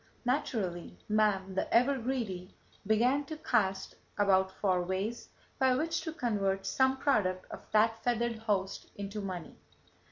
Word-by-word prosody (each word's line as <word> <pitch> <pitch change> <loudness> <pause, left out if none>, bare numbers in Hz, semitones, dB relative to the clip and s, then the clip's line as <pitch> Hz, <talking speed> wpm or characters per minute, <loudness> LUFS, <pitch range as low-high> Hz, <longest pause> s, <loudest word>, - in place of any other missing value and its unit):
Naturally 215 - -1
man, 210 -3 +2
the 190 - -2
ever 250 +4 +4
greedy, 225 -7 -3 0.3
began 245 +7 +3
to 310 +2 -6
cast 190 -9 0 0.2
about 190 -2 +3
for 190 -2 +1
ways 190 +6 -3 0.3
by 260 -1 +4
which 325 +4 0
to 320 - -4
convert 200 -9 -1
some 265 0 +2
product 200 -10 +1
of - - -7
that 225 +1 +3
feathered 235 -1 0
host 200 -3 -2
into 200 +1 -5
money. 185 -4 -6
215 Hz, 135 wpm, -31 LUFS, 190-245 Hz, 0.3 s, ever